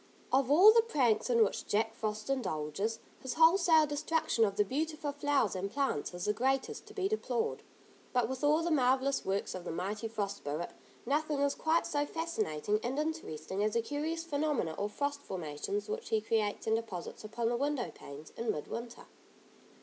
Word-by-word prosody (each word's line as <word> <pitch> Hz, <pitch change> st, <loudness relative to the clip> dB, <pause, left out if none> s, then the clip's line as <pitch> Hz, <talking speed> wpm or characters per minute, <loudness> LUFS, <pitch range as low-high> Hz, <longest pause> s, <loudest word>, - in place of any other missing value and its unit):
Of 265 Hz, -1 st, +3 dB
all 365 Hz, +9 st, +9 dB
the 460 Hz, -, +6 dB
pranks 260 Hz, -, +1 dB
in 230 Hz, -2 st, +5 dB
which 205 Hz, -, -2 dB
Jack 225 Hz, +2 st, +1 dB
Frost 215 Hz, -1 st, -3 dB
indulges, 200 Hz, -, -1 dB, 0.2 s
his 260 Hz, -, -4 dB
wholesale 325 Hz, -1 st, +6 dB
destruction 295 Hz, -5 st, +1 dB
of 200 Hz, -1 st, -2 dB
the 210 Hz, -, +3 dB
beautiful 305 Hz, +4 st, -2 dB
flowers 285 Hz, -7 st, +1 dB
and 190 Hz, +2 st, -2 dB
plants 270 Hz, -, -1 dB
is 175 Hz, -, -4 dB
the 210 Hz, -, +2 dB
greatest 265 Hz, -, -1 dB
to 420 Hz, -, -13 dB
be 385 Hz, -2 st, +1 dB
deplored. 445 Hz, +2 st, -1 dB, 0.5 s
But 245 Hz, -3 st, +2 dB
with 260 Hz, +3 st, -5 dB
all 305 Hz, +3 st, +4 dB
the 340 Hz, -, 0 dB
marvellous 270 Hz, -1 st, +2 dB
works 195 Hz, +1 st, -1 dB
of 185 Hz, -, -6 dB
the -, -, -6 dB
mighty 200 Hz, +7 st, -3 dB
Frost 205 Hz, -3 st, -3 dB
Spirit, 150 Hz, +4 st, -4 dB, 0.3 s
nothing 295 Hz, +2 st, 0 dB
is 285 Hz, 0 st, +2 dB
quite 320 Hz, +1 st, +1 dB
so 290 Hz, -1 st, 0 dB
fascinating 215 Hz, -, -1 dB
and 250 Hz, +3 st, -2 dB
interesting 295 Hz, -, -2 dB
as 215 Hz, 0 st, +1 dB
the 230 Hz, -, +3 dB
curious 310 Hz, +5 st, -2 dB
phenomena 295 Hz, -, 0 dB
or 205 Hz, -, -2 dB
frost 285 Hz, +5 st, -2 dB
formations 180 Hz, -, -4 dB
which 450 Hz, +2 st, -4 dB
he 220 Hz, -, +3 dB
creates 215 Hz, -1 st, -1 dB
and 220 Hz, 0 st, +3 dB
deposits 205 Hz, -6 st, -6 dB
upon 225 Hz, +2 st, -1 dB
the 240 Hz, -, 0 dB
window 280 Hz, 0 st, -1 dB
panes 145 Hz, +2 st, -11 dB
in 230 Hz, 0 st, -3 dB
mid 150 Hz, -, -5 dB
winter. 235 Hz, 0 st, -6 dB
250 Hz, 185 wpm, -32 LUFS, 210-300 Hz, 0.5 s, all